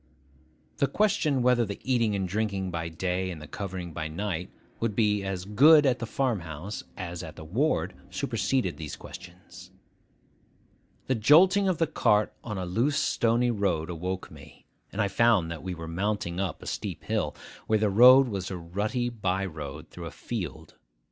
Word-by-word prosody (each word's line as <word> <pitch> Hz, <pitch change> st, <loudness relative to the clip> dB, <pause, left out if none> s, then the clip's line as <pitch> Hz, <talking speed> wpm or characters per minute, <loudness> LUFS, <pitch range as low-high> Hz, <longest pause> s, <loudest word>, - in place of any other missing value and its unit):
The 140 Hz, -, +2 dB
question 150 Hz, -6 st, +1 dB
whether 125 Hz, -1 st, +4 dB
the 100 Hz, -2 st, -5 dB
eating 115 Hz, -5 st, +1 dB
and 95 Hz, -1 st, -1 dB
drinking 100 Hz, -1 st, -2 dB
by 80 Hz, -1 st, -3 dB
day, 90 Hz, +2 st, -2 dB
and 85 Hz, -4 st, -6 dB
the 75 Hz, -, -9 dB
covering 90 Hz, -3 st, -6 dB
by 80 Hz, -1 st, -3 dB
night, 90 Hz, +1 st, -3 dB, 0.3 s
would 115 Hz, -3 st, -1 dB
be 105 Hz, -2 st, +2 dB
as 95 Hz, -2 st, -4 dB
good 145 Hz, +9 st, +6 dB
at 130 Hz, -2 st, +2 dB
the 115 Hz, -, -4 dB
farm 125 Hz, -2 st, 0 dB
house 85 Hz, +4 st, -6 dB, 0.2 s
as 85 Hz, -3 st, -5 dB
at 80 Hz, -2 st, -8 dB
the -, -, -9 dB
ward 120 Hz, -, 0 dB, 0.2 s
superseded 125 Hz, -10 st, -1 dB
those 80 Hz, -2 st, -6 dB
questions. 90 Hz, +1 st, -12 dB, 1.4 s
The 130 Hz, -, +1 dB
jolting 180 Hz, -, +5 dB
of 185 Hz, -3 st, +1 dB
the 165 Hz, -, +2 dB
cart 105 Hz, -9 st, +2 dB
on 105 Hz, -3 st, -5 dB
a 95 Hz, -, -3 dB
loose 120 Hz, +11 st, +1 dB
stony 120 Hz, +1 st, +2 dB
road 90 Hz, -6 st, -1 dB
awoke 90 Hz, +2 st, -4 dB
me; 75 Hz, -1 st, -15 dB, 0.3 s
and 100 Hz, -, -7 dB
I 105 Hz, -, +3 dB
found 100 Hz, -4 st, +3 dB
that 85 Hz, -, -6 dB
we 90 Hz, -1 st, -4 dB
were 80 Hz, -1 st, -7 dB
mounting 90 Hz, 0 st, -2 dB
a 95 Hz, -5 st, -1 dB
steep -, -, -5 dB
hill, -, -, -1 dB, 0.3 s
where 110 Hz, -, +3 dB
the 105 Hz, -1 st, +1 dB
road 125 Hz, +5 st, +8 dB
was 100 Hz, -5 st, -4 dB
a 95 Hz, -, -4 dB
rutty 105 Hz, +9 st, -2 dB
by 95 Hz, -4 st, -1 dB
road 75 Hz, -3 st, -7 dB
through 85 Hz, -1 st, -7 dB
a -, -, -5 dB
field. 95 Hz, -, -6 dB
100 Hz, 175 wpm, -27 LUFS, 90-120 Hz, 1.4 s, road